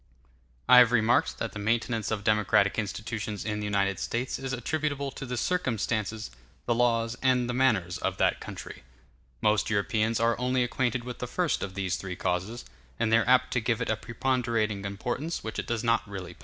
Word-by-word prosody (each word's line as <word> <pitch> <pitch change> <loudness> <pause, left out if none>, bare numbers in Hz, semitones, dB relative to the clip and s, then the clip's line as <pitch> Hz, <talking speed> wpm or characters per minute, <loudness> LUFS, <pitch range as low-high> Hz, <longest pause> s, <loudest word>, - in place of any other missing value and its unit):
I 125 0 +9
have 120 -2 +6
remarked 115 0 +2
that 115 - -3
the 105 - -7
maintenance 115 +1 0
of 110 -2 -2
democratic 105 -1 +3
institutions 105 -1 -4
in 105 -1 -2
the 105 - -3
United 100 -2 0
States 120 +2 -2
is 135 -1 -4
attributable 140 +2 -2
to 135 - -7
the 125 0 -3
circumstances, 110 - -1 0.3
the 120 - +2
laws, 115 -1 +1
and 125 -2 +2
the 125 - -2
manners 110 -9 +1
of - - -2
that - - +2
country. - - -8
*l - - -17 0.6
Most 105 -2 +2
Europeans 110 +2 +1
are 115 0 +3
only 125 0 +1
acquainted 125 0 -1
with 125 0 -7
the 125 - -3
first 175 +6 0
of 95 -2 -5
these 95 -2 -1
three 90 -2 -6
causes, 90 +8 -2 0.3
and 110 -1 +1
they - - +8
are 115 - -1
apt 130 0 +4
to 125 - +2
give 115 0 0
it 120 - -1
a - - +2
preponderating 115 -3 -1
importance 125 +11 -3
which 110 - -4
it - - -4
does 120 -1 -2
not 115 0 +3
really 95 -3 -7
possess. - - -25
115 Hz, 200 wpm, -28 LUFS, 105-125 Hz, 0.6 s, I